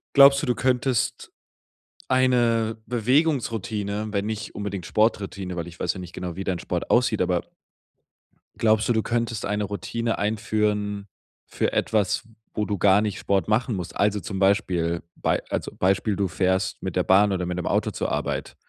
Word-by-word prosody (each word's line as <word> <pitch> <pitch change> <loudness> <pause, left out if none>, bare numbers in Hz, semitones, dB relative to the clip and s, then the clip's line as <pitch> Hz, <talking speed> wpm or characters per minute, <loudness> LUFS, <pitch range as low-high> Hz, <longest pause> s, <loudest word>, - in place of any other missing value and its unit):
Glaubst 140 0 +8
du, - - -2
du 125 - +1
könntest 130 0 0 0.8
eine 120 -3 +2
Bewegungsroutine, 115 - 0
wenn 100 -1 -1
nicht 110 -1 -4
unbedingt 100 -3 -4
Sporttroutine, 100 -4 0
weil 85 -1 -4
ich 85 0 -12
weiß 90 - 0
ja - - -8
nicht 90 -2 -9
genau, 90 -2 -5
wie 95 - -4
dein 90 -2 -2
Sport - - -3
aussieht, - - +3
aber - - +1 1.2
glaubst 110 0 +3
du, - - +4
du 110 -1 +1
könntest 115 -2 -1
eine 105 +1 -1
Routine 115 +3 -3
einführen 105 -1 -1 0.4
für - - -1
etwas, 105 -1 +1 0.3
wo 105 - -1
du 105 -1 -2
gar 100 +2 +5
nicht 105 -2 -2
Sport 100 -1 0
machen 110 +2 +1
musst? 90 -2 -6
Also, 105 0 +2
zum 100 -3 -5
Beispiel, 90 -4 +1
bei - - 0
also - - -3
Beispiel, 95 +3 +1
du 100 0 0
fährst 95 +3 0
mit 95 -2 -4
der 90 - +2
Bahn 100 +3 +4
oder 90 -2 -1
mit 90 0 -3
dem 90 - -3
Auto - - +1
zur - - -3
Arbeit. - - -3
105 Hz, 175 wpm, -24 LUFS, 95-115 Hz, 1.2 s, Glaubst